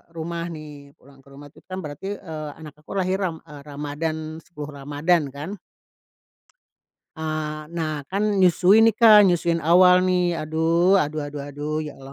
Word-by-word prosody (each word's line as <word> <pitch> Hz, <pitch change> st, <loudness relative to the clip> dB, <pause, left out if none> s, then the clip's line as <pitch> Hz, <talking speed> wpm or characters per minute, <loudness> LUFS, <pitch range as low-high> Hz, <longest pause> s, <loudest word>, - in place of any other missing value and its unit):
rumah 170 Hz, +1 st, -4 dB
nih, 150 Hz, -3 st, -11 dB
pulang 135 Hz, +1 st, -20 dB
ke -, -, -25 dB
rumah 145 Hz, +1 st, -12 dB
tuh 145 Hz, -, -20 dB
kan 185 Hz, -, -5 dB
berarti, 190 Hz, +7 st, -6 dB
eee, 155 Hz, -3 st, -7 dB
anak 155 Hz, -2 st, -11 dB
aku -, -, -13 dB
lahir 185 Hz, +1 st, 0 dB
ram 165 Hz, -3 st, -3 dB
eee, 145 Hz, -2 st, -11 dB
Ramadhan, 155 Hz, +2 st, -5 dB
10 150 Hz, -4 st, -9 dB
Ramadhan 145 Hz, +1 st, 0 dB
kan. 145 Hz, +6 st, -7 dB, 1.7 s
Ah, 155 Hz, -1 st, -4 dB
nah 155 Hz, -4 st, -3 dB
kan 205 Hz, +1 st, 0 dB
nyusui 190 Hz, +4 st, +5 dB
nih, 225 Hz, -, +5 dB
Kak, 215 Hz, -2 st, +7 dB
nyusuin 170 Hz, -2 st, +2 dB
awal 180 Hz, +2 st, +6 dB
nih, 180 Hz, -2 st, +1 dB
aduh 165 Hz, +4 st, +2 dB
aduh 150 Hz, -1 st, -2 dB
aduh 145 Hz, 0 st, -7 dB
aduh 150 Hz, +2 st, -4 dB
ya 150 Hz, -2 st, -7 dB
Allah, 135 Hz, 0 st, -12 dB
160 Hz, 165 wpm, -23 LUFS, 150-180 Hz, 1.7 s, Kak